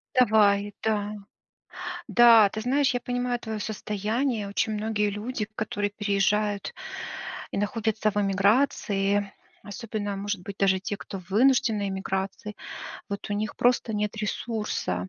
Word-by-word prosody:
Давай, 205 -4 +4
да. 210 -1 0 1.0
Да, 230 -4 +8
ты 220 - -5
знаешь, 270 +4 +2
я 245 - -1
понимаю 245 0 -1
твоё 220 -2 -5
состояние. 215 +2 -1
Очень 210 +2 0
многие 210 -1 0
люди, 210 +1 -3
которые 205 -1 -2
переезжают 205 0 0 0.8
и - - -3
находятся 215 +1 0
в 205 - -14
эмиграции, 200 -1 +2 0.3
особенно 205 -1 -4
может 200 -2 -3
быть 200 +1 -7
даже 190 -1 +3
те, 200 +1 -3
кто 195 -1 -7
в 180 - -20
вынужденной 220 -2 +3
эмиграции, 190 +2 -3 0.5
вот 200 +1 -5
у 205 - +1
них 215 +2 -2
просто 240 -2 +2
нет 210 +1 -1
ресурса, 210 - -2
210 Hz, 130 wpm, -27 LUFS, 200-225 Hz, 1.0 s, Да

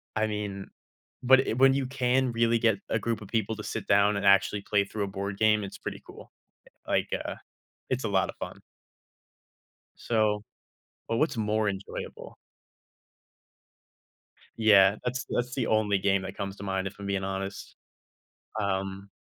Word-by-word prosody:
I 110 0 +1
mean, 105 -2 -4 0.6
but 130 +1 +6
i - - 0
when 135 +3 +5
you 135 0 0
can 130 -1 +1
really 115 0 +2
get 110 -3 +3
a - - +1
group 115 -2 -2
of 105 - -9
people 110 +1 -1
to 105 - -7
sit 110 -1 -5
down 100 +1 +4
and 100 - -2
actually 100 +1 +4
play 100 0 +1
through 105 +1 -4
a - - -2
board 100 0 -4
game, 105 0 +3
it's 100 - -7
pretty - - -6
cool, - - -13 0.4
eh, - - -20 0.2
like, - - +1 0.2
uh, - - -4 0.5
it's 130 0 -1
a - - 0
lotta 95 -1 +1
fun. - - -7 1.4
So, 105 -2 +1 0.7
but 115 - 0
what's 155 -2 +1
more 110 -1 +1
enjoyable? 100 0 -6 2.2
Yeah, 100 -3 +6
that's 125 +1 -1
that's 125 +1 -1
the 125 -4 -1
only 105 -2 +2
game 100 0 +2
that 95 - -6
comes 100 0 -4
to - - -8
mind, 95 -1 -1
if 95 - -9
I'm 100 - -7
being 100 -1 -1
honest. 95 +1 -5 0.9
Um 95 0 -2
105 Hz, 165 wpm, -28 LUFS, 100-115 Hz, 2.2 s, but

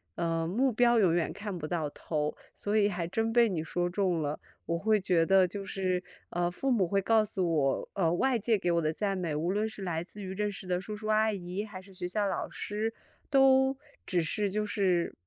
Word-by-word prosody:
呃， 165 -1 -1
目 250 +9 +2
标 240 +1 +4
永 180 -5 +4
远 170 -1 0
看 205 -3 -5
不 155 -2 -5
到 160 -4 -1
头， 150 0 -3 0.2
所 210 +1 -1
以 205 -1 +4
还 175 -4 -2
真 225 +5 -1
被 235 -2 +5
你 170 -4 -1
说 175 +2 -1
中 180 -3 0
了。 145 +1 -2 0.3
我 170 - -1
会 215 +2 +2
觉 175 -3 +3
得 190 +1 +5
就 195 +2 -5
是， 185 -2 -1 0.3
呃， 175 0 0
父 265 +9 -2
母 195 -7 +3
会 200 +2 +1
告 220 +2 +3
诉 195 -3 -1
我， 135 -3 +1
呃， 175 -5 +2
外 245 +6 +2
界 225 +1 +2
给 175 -2 0
我 170 0 +2
的 155 0 0
赞 200 +2 -1
美， 170 -4 -2
无 165 +4 0
论 210 +3 0
是 215 -2 -9
来 170 -3 -2
自 205 +2 -10
于 190 0 -5
认 210 +1 -1
识 195 -1 -8
的 180 -1 0
叔 210 +3 -6
叔 215 +1 -7
阿 215 0 +3
姨， 185 +2 -4
还 190 -3 -9
是 195 - -16
学 180 -1 -4
校 205 +3 0
老 - - -2
师， 215 +2 -3 0.4
都 270 -1 +5 0.3
只 175 -2 +1
是 205 +5 -1
就 210 +2 -1
是 185 -5 +1
190 Hz, 250 characters per minute, -30 LUFS, 175-215 Hz, 0.4 s, 被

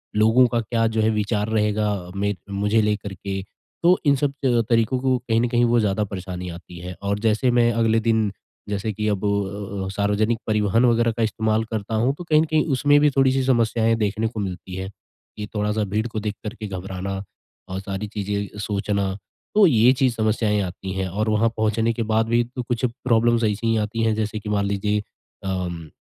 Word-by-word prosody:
लोगों 110 +4 +5
का 120 0 0
क्या 115 +1 0
जो 110 0 0
है 110 - +3
विचार 105 0 0
रहेगा 105 -1 +1
अ, 90 -2 -6
में 100 +1 0 0.2
मुझे 105 +2 +1
लेकर 105 -2 -1
के, 95 +1 -4 0.4
तो 180 +2 +6
इन 140 -1 +5
सब 140 +1 0
अ, 120 -2 +3
तरीकों 115 +2 +2
को 130 -1 +2
कहीं 115 -2 0
न 120 - +2
कहीं 120 0 +3
वो 120 0 +3
ज़्यादा 105 0 +1
परेशानी 90 -2 -6
आती 85 0 -10
है। 90 +1 -7
और 100 +1 -1
जैसे 115 +3 +2
मैं 120 -1 +4
अगले 115 0 +2
दिन 110 -2 +1 0.4
जैसे 105 +2 -2
कि 105 +2 -2
अब 105 -1 -1
अ 100 0 -2
अ - - -3
अ, - - -4
सार्वजनिक 105 +3 +1
परिवहन 110 +2 +2
वगैरह 115 -1 +3
का 115 - +1
इस्तेमाल 110 0 0
करता 110 0 -3
हूँ, 125 +5 +2
तो 175 - -7
कहीं 155 -2 +4
न - - +1
कहीं 155 -1 +1
उसमें 145 +1 +5
भी 150 0 +5
थोड़ी-सी 135 0 +3
समस्याएँ 115 -3 +2
देखने 110 +1 0
को 110 -1 -5
मिलती 95 -1 -5
है। 95 0 -4 0.5
कि 105 - -4
थोड़ा-सा 105 +1 0
भीड़ 110 +3 0
को 110 -1 -4
देख 105 0 -3
कर 105 +1 -4
के 105 - -4
घबराना 95 0 -5 0.6
और 95 +1 -3
सारी 100 +2 -4
चीज़ें 100 0 -4
सोचना। 100 -1 -1 0.4
तो 210 -2 +7
ये 120 -2 +5
चीज़ 130 -2 +1
समस्याएँ 110 -1 +1
आती 95 +1 -5
हैं, 95 -1 -2
और 105 +4 -1
वहाँ 110 +2 +3
पहुँचने 110 +1 +1
के 115 - -2
बाद 110 +1 +3
भी 120 0 +3
तो 125 +1 -6
कुछ 120 0 -3
प्रॉब्लम्स 120 -1 +1
ऐसी 105 +1 0
ही 115 - +3
आती 110 +2 -2
हैं, 110 -1 +2
जैसे 110 0 -2
कि 105 - -7
मान 100 -1 +1
लीजिए 105 +1 0 0.4
अम, 90 -4 -3
110 Hz, 210 wpm, -23 LUFS, 100-115 Hz, 0.6 s, तो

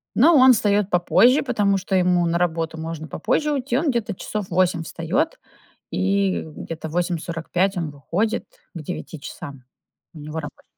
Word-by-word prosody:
Ну 310 +9 +6
он 260 -2 +8
встаёт 205 -2 +1
попозже, 230 +9 +4
потому 205 -7 +1
что 190 0 -2
ему 180 -1 +3
на 170 0 +1
работу 165 -2 -1
можно 160 0 -5
попозже 300 - 0
уйти. 260 -3 -1
Он 310 +2 +1
где-то 235 -5 -1
часов 210 +1 -4
в - - -25
8 180 -1 +2
встаёт, 170 - -2 0.5
и 195 0 +1
где-то 160 +1 -7
в - - -10
8:45 175 +2 -1
он 170 -4 -2
выходит, 170 +10 -2 0.3
к 155 - -6
часам, 140 -3 -9 0.5
у - - -10
него 150 +1 -8
работ 145 -1 -10
180 Hz, 160 wpm, -22 LUFS, 165-210 Hz, 0.5 s, он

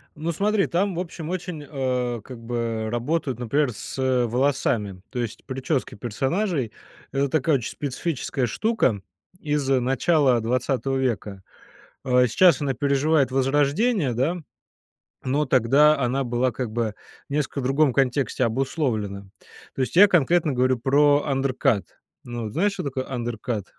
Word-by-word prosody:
Ну 160 +3 -3
смотри, 200 +3 +1
там, 185 +1 0
в - - -3
общем, 165 -3 -6
очень, 175 -4 -4
а, 125 -5 -2
как 125 0 -10
бы 115 -2 -3
работают, 125 +1 -2
например, 125 +3 +1
с 100 - -8 0.3
волосами. 120 -6 0
То 125 - -5
есть 115 -3 -5
прически 130 +1 -2
персонажей- 135 - -1 0.4
это 140 +1 0
такая 155 +1 +2
очень 120 - -5
специфическая 140 -2 -3
штука 130 - 0 0.4
из 150 -4 -1
начала 135 +1 +3
20 130 +3 -1
века. 105 -7 -2 0.6
А, 125 0 +4
сейчас 165 +5 +4
она 135 -2 -1
переживает 140 +1 +2
возрождение, 145 - +1
да, 135 +9 0 0.9
но 140 +4 +1
тогда 140 +5 +4
она 135 +2 0
была 120 +1 0
как 125 -3 -4
бы 115 -2 -1 0.3
в - - -9
несколько 145 -1 -1
другом 135 +2 +2
контексте 130 0 +1
обусловлена. 115 -6 -2 0.5
То 135 - 0
есть 125 - -3
я 205 +2 +9
конкретно 170 -2 +3
говорю 130 0 +2
про 145 +3 +3
undercut. 135 -5 +1 0.4
Ну, 120 -2 -5
знаешь, 195 - +1
что 195 -2 -5
такое 130 -1 -3
undercut? 120 -4 -3
135 Hz, 140 wpm, -24 LUFS, 120-150 Hz, 0.9 s, я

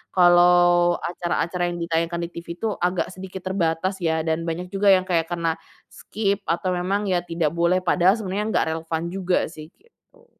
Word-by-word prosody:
kalau 175 -1 +5
acara-acara 175 0 -2
yang 175 - -5
ditayangkan 170 +1 -1
di - - -9
TV 170 - -9
itu 225 - -2
agak 180 0 0
sedikit 190 0 -8
terbatas 185 0 -1
ya 160 -1 +1
dan 160 +1 0
banyak 170 +2 -3
juga 200 +1 +3
yang 185 0 0
kayak 165 -2 +1
karena, 170 -2 -1 0.4
skip 200 -1 -2
atau 175 +3 0
memang 190 +4 -1
ya 180 -3 +1
tidak 165 -3 -1
boleh, 170 +2 +2
padahal 180 +3 +4
sebenarnya 205 -1 -3
nggak - - +2
relevan 160 0 -3
juga 185 -1 0
sih 155 0 -11
gitu. 470 - -29
175 Hz, 175 wpm, -23 LUFS, 170-190 Hz, 0.4 s, kalau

